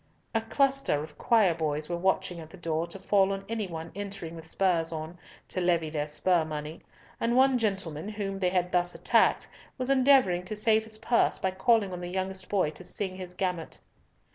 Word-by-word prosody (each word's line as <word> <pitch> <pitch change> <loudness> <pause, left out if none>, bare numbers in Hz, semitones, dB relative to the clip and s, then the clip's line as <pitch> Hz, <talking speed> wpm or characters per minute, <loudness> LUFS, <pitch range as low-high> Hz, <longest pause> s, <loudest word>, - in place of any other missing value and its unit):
A 225 - +2
cluster 270 - +1
of 150 -1 -12
choir 215 -7 +4
boys 155 -2 -2
were 175 - -2
watching 180 -1 0
at 160 -1 -10
the 190 - -12
door 165 -1 -2
to 170 - -7
fall 195 0 +2
on 195 0 -4
any 220 -3 -2
one 165 -1 -7
entering 195 -4 -6
with 160 -1 -9
spurs 170 -2 +1
on, 160 +2 -6 0.3
to 185 - -2
levy 170 -3 +1
their 150 -1 -2
spur 170 +3 +2
money, 155 0 -6 0.4
and 235 +1 +1
one 260 0 +5
gentleman, 195 -5 -2
whom 200 -2 -4
they 180 -2 +2
had 180 -1 0
thus 175 0 +1
attacked, - - +3 0.3
was 255 0 0
endeavouring 260 -10 +4
to 215 - -4
save 220 +1 +3
his 220 -1 -5
purse 235 +2 +2
by 190 - -1
calling 200 0 +2
on 180 - -5
the 175 - -4
youngest 190 +1 -4
boy 190 -7 +1
to 185 - -9
sing 185 +1 -4
his 180 -1 -8
gamut. 180 -3 -2
185 Hz, 200 wpm, -28 LUFS, 165-210 Hz, 0.4 s, one